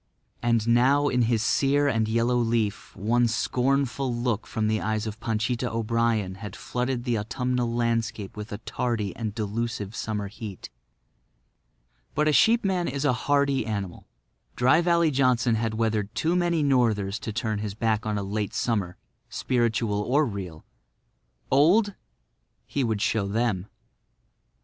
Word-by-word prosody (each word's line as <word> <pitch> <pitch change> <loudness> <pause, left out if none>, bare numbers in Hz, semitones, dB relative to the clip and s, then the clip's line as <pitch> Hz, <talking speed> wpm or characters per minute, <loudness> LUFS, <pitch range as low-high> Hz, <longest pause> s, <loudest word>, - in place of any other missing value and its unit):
And 115 -2 +1
now 135 +5 +4
in 125 - +1
his 115 -3 +1
sere 145 +3 +2
and 115 -5 +1
yellow 115 +2 +1
leaf 115 -3 -1
one 120 +4 +2
scornful 130 +3 0
look 120 -2 -1
from 110 -2 -1
the 110 0 0
eyes 110 0 -1
of 110 0 -6
Panchita 120 +2 -1
O'Brien 115 -3 0
had 105 -4 -7
flooded 125 0 -2
the 120 -3 0
autumnal 125 +2 -1
landscape 115 -4 -1
with 105 0 -7
a 105 - -4
tardy 110 -4 -3
and 110 -3 -4
delusive 110 -1 -3
summer 105 -3 -3
heat. 105 -2 -8 1.4
But 150 +1 +2
a - - +4
sheepman 195 -3 +3
is 140 +2 -2
a 135 - +3
hardy 140 +1 +1
animal. 100 -5 -4 0.5
Dry 130 +7 +4
Valley 170 -2 +3
Johnson 125 -3 +2
had 110 0 -1
weathered 110 -1 -1
too 160 +9 +1
many 170 -3 +1
northers 110 -7 +1
to 110 - -5
turn 110 -1 -2
his 105 -1 -4
back 110 -1 0
on 105 -1 -2
a 100 - -2
late 105 +1 -3
summer, 100 -7 -1 0.3
spiritual 115 -4 0
or 140 +8 +2
real. 95 - -6 0.9
Old? 185 +10 +4 0.7
He 140 - -1
would 110 -3 0
show 110 -2 +1
them. 105 -3 -1
115 Hz, 145 wpm, -26 LUFS, 105-125 Hz, 1.4 s, now